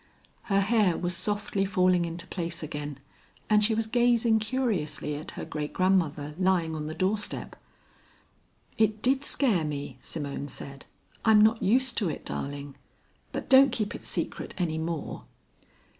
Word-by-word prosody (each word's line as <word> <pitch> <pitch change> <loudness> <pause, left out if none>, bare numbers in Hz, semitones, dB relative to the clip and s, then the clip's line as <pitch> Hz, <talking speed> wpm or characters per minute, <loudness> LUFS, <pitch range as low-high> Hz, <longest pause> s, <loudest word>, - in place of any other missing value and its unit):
Her 195 -1 +2
hair 205 -4 +3
was 175 0 -1
softly 205 +1 0
falling 185 -2 +2
into 170 +1 -5
place 170 -3 -4
again, 145 -2 -5 0.5
and 210 0 +5
she 220 +1 +3
was 225 0 0
gazing 235 -1 +3
curiously 215 - -1
at 150 +2 -6
her - - -4
great 150 -1 -4
grandmother 165 -6 +1
lying 180 -4 +2
on 150 -1 -4
the 155 - -5
doorstep. 200 +4 -1 1.2
"It 215 -1 +2
did 265 +2 +3
scare 230 - +2
me," 145 -3 -5
Simone 145 -2 -4
said. 135 0 -9 0.4
"I'm 220 -1 +6
not 220 +1 +3
used 250 +4 +2
to 200 -6 0
it, - - -6
darling. 140 0 -5 0.5
But - - -5
don't 270 0 +7
keep 215 -4 -2
it - - -8
secret - - -3
any 160 -3 -1
more." 160 -1 -4
185 Hz, 150 wpm, -28 LUFS, 155-220 Hz, 1.2 s, don't